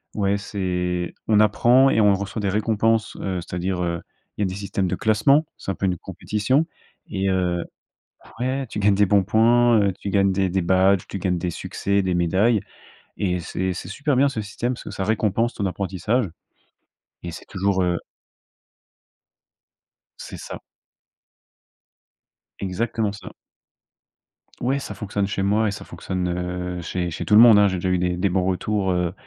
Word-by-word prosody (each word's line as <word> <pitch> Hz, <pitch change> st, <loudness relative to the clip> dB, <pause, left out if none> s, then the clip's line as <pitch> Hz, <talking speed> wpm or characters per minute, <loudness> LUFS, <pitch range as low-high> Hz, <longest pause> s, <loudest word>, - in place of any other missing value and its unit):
ouais 100 Hz, -1 st, +1 dB
c'est 90 Hz, -3 st, -2 dB
on 105 Hz, -1 st, +4 dB
apprend 120 Hz, +5 st, +5 dB
et 110 Hz, -, +3 dB
on 100 Hz, -1 st, +5 dB
reçoit 100 Hz, +2 st, -4 dB
des 100 Hz, -, 0 dB
récompenses, 110 Hz, +1 st, +1 dB
heu, 95 Hz, -2 st, -3 dB
c'est-à-dire, 90 Hz, +1 st, -3 dB
heu, 85 Hz, -1 st, -2 dB, 0.4 s
il -, -, -3 dB
y -, -, +3 dB
a -, -, +2 dB
des 95 Hz, -, -5 dB
systèmes 100 Hz, -2 st, -2 dB
de 90 Hz, -, -1 dB
classement, 125 Hz, -, +3 dB
c'est -, -, -8 dB
un -, -, -4 dB
peu 100 Hz, -, -2 dB
une 90 Hz, -2 st, 0 dB
compétition 130 Hz, -, -1 dB, 0.5 s
et 95 Hz, 0 st, 0 dB
heu 90 Hz, -2 st, 0 dB, 0.8 s
ouais 130 Hz, +1 st, -1 dB
tu 105 Hz, -, -7 dB
gagnes 100 Hz, 0 st, +4 dB
des 100 Hz, -1 st, +3 dB
bons 100 Hz, -1 st, +4 dB
points, 115 Hz, +3 st, +4 dB
heu, 100 Hz, -1 st, +2 dB
tu 100 Hz, -, -4 dB
gagnes 100 Hz, -1 st, +3 dB
des 95 Hz, 0 st, +1 dB
des 95 Hz, +1 st, 0 dB
badges, 95 Hz, +1 st, +3 dB
tu 100 Hz, -, -5 dB
gagnes 90 Hz, -1 st, -1 dB
des 90 Hz, -, -2 dB
succès, 100 Hz, +3 st, -1 dB
des 90 Hz, -1 st, 0 dB
médailles 95 Hz, +6 st, +2 dB, 0.6 s
et 90 Hz, -3 st, 0 dB
c'est 95 Hz, +2 st, -3 dB
c'est 90 Hz, -, -7 dB
super 145 Hz, +7 st, -1 dB
bien 140 Hz, +2 st, +4 dB
ce 110 Hz, -5 st, -4 dB
système, 120 Hz, +5 st, -3 dB
parce -, -, -9 dB
que -, -, -6 dB
ça 95 Hz, -1 st, -3 dB
récompense 110 Hz, +2 st, 0 dB
ton 100 Hz, -, -3 dB
apprentissage 100 Hz, +5 st, -1 dB, 1.0 s
et 85 Hz, -, -5 dB
c'est 80 Hz, -, -10 dB
toujours, 95 Hz, -1 st, 0 dB
heu 90 Hz, -1 st, +1 dB, 2.2 s
C'est -, -, -8 dB
ça. -, -, -8 dB, 2.0 s
Exactement 105 Hz, +2 st, -1 dB
ça. 100 Hz, -, -10 dB, 1.3 s
Ouais, 135 Hz, +3 st, +1 dB
ça -, -, -6 dB
fonctionne 100 Hz, -1 st, -2 dB
chez 100 Hz, -, -2 dB
moi 105 Hz, +3 st, +2 dB
et -, -, 0 dB
ça -, -, -7 dB
fonctionne, 90 Hz, -1 st, -4 dB, 0.5 s
heu, -, -, -5 dB
chez 90 Hz, +1 st, -3 dB
chez 80 Hz, -, -5 dB
tout 105 Hz, -, 0 dB
le 105 Hz, -, +9 dB
monde, 115 Hz, -3 st, +8 dB
hein. 100 Hz, 0 st, +6 dB
J'ai 95 Hz, -1 st, -1 dB
déjà 90 Hz, +1 st, -1 dB
eu 90 Hz, -, +2 dB
des 90 Hz, 0 st, 0 dB
des 95 Hz, +1 st, +1 dB
bons 90 Hz, 0 st, +1 dB
retours, 95 Hz, +1 st, 0 dB
heu, 90 Hz, -1 st, 0 dB
100 Hz, 180 wpm, -23 LUFS, 90-110 Hz, 2.2 s, le